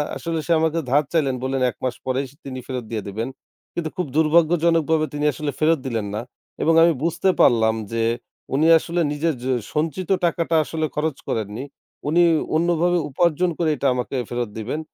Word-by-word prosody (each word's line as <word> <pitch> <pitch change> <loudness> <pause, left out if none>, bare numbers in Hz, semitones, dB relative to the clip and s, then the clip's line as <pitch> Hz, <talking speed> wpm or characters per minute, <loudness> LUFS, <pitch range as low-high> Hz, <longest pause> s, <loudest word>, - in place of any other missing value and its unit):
আসলে 165 -1 -3
সে 170 - -2
আমাকে 160 +1 +1
ধার 145 +3 +4
চাইলেন 140 -6 +2
বললেন, 130 0 -1
১ - - -8
মাস 125 -1 -1
পরেই 130 +1 0
স - - -18
তিনি 130 -2 -5
ফেরত 130 -2 -4
দিয়ে 110 -3 -3
দেবেন। 110 +5 -3 0.4
কিন্তু 165 -2 -3
খুব 180 - 0
দুর্ভাগ্যজনকভাবে 160 0 +3
তিনি 145 0 -1
আসলে 145 +2 -3
ফেরত 160 0 +3
দিলেন 115 -4 -2
না। 110 - -2 0.4
এবং 165 - +4
আমি 170 0 +5
বুঝতে 170 +3 +1
পারলাম 110 -2 +4 0.2
যে 115 0 +1 0.5
উনি 150 +4 +3
আসলে 170 +2 -2
নিজের 155 +2 0
যে 130 - 0 0.2
সঞ্চিত 160 +4 -2 0.2
টাকাটা 170 -1 0
আসলে 160 +1 -2
খরচ 150 -2 -1
করেননি। 110 +3 -3 0.4
উনি 165 +4 +3 0.3
অন্যভাবে 175 +2 +2
উপার্জন 175 +4 +2
করে 165 -2 +1
এটা 140 - 0
আমাকে 125 +2 -3
ফেরত 120 -2 -2
দিবেন 115 +7 -3
155 Hz, 175 wpm, -22 LUFS, 130-165 Hz, 0.5 s, আমি